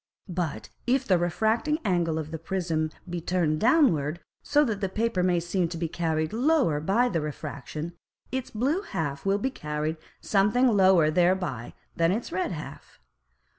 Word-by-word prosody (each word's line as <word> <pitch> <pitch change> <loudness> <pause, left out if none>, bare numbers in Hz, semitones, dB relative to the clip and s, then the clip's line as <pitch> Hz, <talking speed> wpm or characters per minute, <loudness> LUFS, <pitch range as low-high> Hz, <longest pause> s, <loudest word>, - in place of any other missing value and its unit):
But 165 -11 -3 0.2
if 260 +1 +2
the 185 -3 +4
refracting 220 - +1
Angle 170 -4 +1
of 155 -1 -4
the 160 - -5
Prism 165 -2 -1 0.2
be 175 -1 -4
turned 170 -3 0
downward, 175 - +3 0.2
so 295 +1 +3
that 215 -5 -2
the 195 - 0
Paper 220 -1 0
may 180 -1 +2
seem 175 +1 0
to 170 0 -6
be 165 0 -1
carried 160 0 -1
lower 250 - +2
by 200 +11 +2
the 170 -9 -1
Refraction, 150 +2 -6 0.4
its 260 -1 -3
blue 275 - 0
half 145 - -4
will 195 +1 +3
be 265 +6 -1
carried 150 -4 -3 0.2
something 210 +6 +3
lower 190 -8 +5
thereby 175 -8 0 0.2
than 165 +1 +3
its 220 +5 -2
red 185 +2 -1
half. 155 -3 -9
175 Hz, 165 wpm, -27 LUFS, 160-220 Hz, 0.4 s, lower